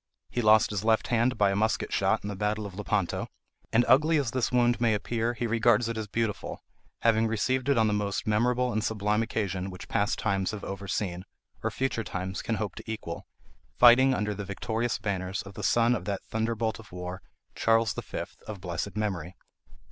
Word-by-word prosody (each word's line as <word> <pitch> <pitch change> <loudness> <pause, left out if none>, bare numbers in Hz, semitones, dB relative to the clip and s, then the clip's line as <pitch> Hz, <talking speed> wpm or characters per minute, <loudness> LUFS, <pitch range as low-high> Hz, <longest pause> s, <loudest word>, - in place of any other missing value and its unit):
He 120 - 0
lost 110 -1 +5
his 105 -1 -2
left 110 0 +2
hand 120 0 +2
by 100 -2 +4
a - - -1
musket 110 +2 0
shot - - +2
in - - -4
the 105 - -4
battle 105 +2 -1
of 100 - -7
Lepanto: 100 -2 -1 0.4
and 120 +2 +4
ugly 155 +5 +5
as 135 -6 0
this 130 -2 0
wound 120 -1 +3
may 115 -3 +3
appear, 115 +3 -1
he 120 - -2
regards 115 0 +3
it 115 - -2
as 110 -1 -4
beautiful, 110 0 -3 0.4
having 115 -1 +3
received 130 +5 0
it 140 - +3
on 110 - +4
the 105 - +1
most 105 -1 -1
memorable 120 +3 +1
and 110 0 0
sublime 105 -1 0
occasion 95 -4 -2
which 90 -1 -9
past 105 0 0
times 100 -3 0
have 105 -2 -5
over 100 +1 -6
seen, 90 -3 -2 0.4
or - - 0
future 130 -3 -1
times 95 -1 -4
can 115 - -1
hope 105 -3 -3
to 110 - -6
equal, 95 -6 -6 0.5
fighting 125 +2 +7
under 105 -2 -1
the 100 0 -5
victorious 110 +4 -2
banners 95 -2 -3
of 100 0 -11
the - - -7
son 120 +1 +3
of 95 -7 -3
that 100 -1 -3
thunderbolt 110 0 -1
of 115 - -14
war, 90 +1 -6 0.3
Charles 115 -2 +2
V., - - -4 0.2
of 105 -2 -6
blessed 90 +3 -4
memory." 95 -5 -2
110 Hz, 200 wpm, -28 LUFS, 100-115 Hz, 0.5 s, fighting